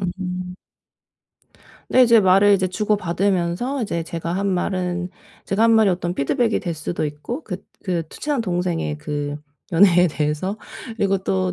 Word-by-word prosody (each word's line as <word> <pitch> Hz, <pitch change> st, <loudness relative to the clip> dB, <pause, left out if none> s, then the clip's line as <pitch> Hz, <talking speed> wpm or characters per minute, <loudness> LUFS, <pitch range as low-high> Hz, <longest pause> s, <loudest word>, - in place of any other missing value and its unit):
음음. 180 Hz, -1 st, -4 dB, 1.3 s
네 255 Hz, -, +5 dB
이제 235 Hz, -2 st, +6 dB
말을 195 Hz, +1 st, +5 dB
이제 185 Hz, -1 st, +1 dB
주고받으면서 195 Hz, +4 st, 0 dB
이제 170 Hz, -6 st, -2 dB
제가 165 Hz, 0 st, -4 dB
한 200 Hz, +1 st, -1 dB
말은 180 Hz, -1 st, -1 dB, 0.3 s
제가 200 Hz, +3 st, 0 dB
한 230 Hz, -, +5 dB
말이 220 Hz, -3 st, +5 dB
어떤 175 Hz, 0 st, -2 dB
피드백이 220 Hz, -, +1 dB
될 175 Hz, -, -3 dB
수도 155 Hz, +1 st, -3 dB
있고 150 Hz, -, -5 dB
그 180 Hz, -4 st, -4 dB, 0.3 s
그 180 Hz, -3 st, -1 dB
친한 290 Hz, -, -2 dB
동생의 175 Hz, -6 st, -1 dB
그 145 Hz, -1 st, -4 dB, 0.3 s
연애에 180 Hz, 0 st, +5 dB
대해서 150 Hz, +6 st, -2 dB, 0.4 s
그리고 195 Hz, -2 st, +1 dB
또 95 Hz, -, -1 dB
180 Hz, 290 characters per minute, -21 LUFS, 170-200 Hz, 1.3 s, 이제